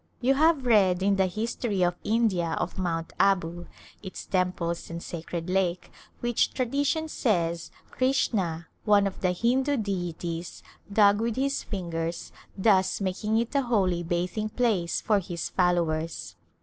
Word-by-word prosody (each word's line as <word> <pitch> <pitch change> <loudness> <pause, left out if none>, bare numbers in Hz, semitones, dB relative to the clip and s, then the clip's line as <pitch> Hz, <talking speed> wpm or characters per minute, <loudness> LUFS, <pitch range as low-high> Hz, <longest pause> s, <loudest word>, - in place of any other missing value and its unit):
You 255 +2 +3
have 305 -1 +3
read 190 -6 +4
in 200 0 +3
the 190 -1 +3
history 215 0 -1
of 175 0 +2
India 205 -7 +1
of - - -3
Mount 165 -3 -2
Abu, 175 -3 +1 0.3
its 190 -2 -8
temples 180 -2 -1
and 165 - -5
sacred 165 0 -5
lake, 185 -1 0 0.3
which 240 -1 +1
tradition 285 +5 0
says 170 - 0 0.2
Krishna, 195 -11 0 0.2
one 205 -1 +4
of 195 - -4
the 185 - +2
Hindu 260 +9 +1
deities, 175 -5 -4 0.3
dug 205 0 +5
with 230 -1 -1
his 275 +1 0
fingers, 170 -3 -4 0.3
thus 190 -2 +3
making 205 +3 -1
it 235 +3 -1
a 280 - +3
holy 195 -8 +1
bathing 175 +5 -2
place 210 -8 0
for 210 -2 +2
his 175 -3 -5
followers. 165 -3 0
190 Hz, 140 wpm, -27 LUFS, 175-230 Hz, 0.3 s, dug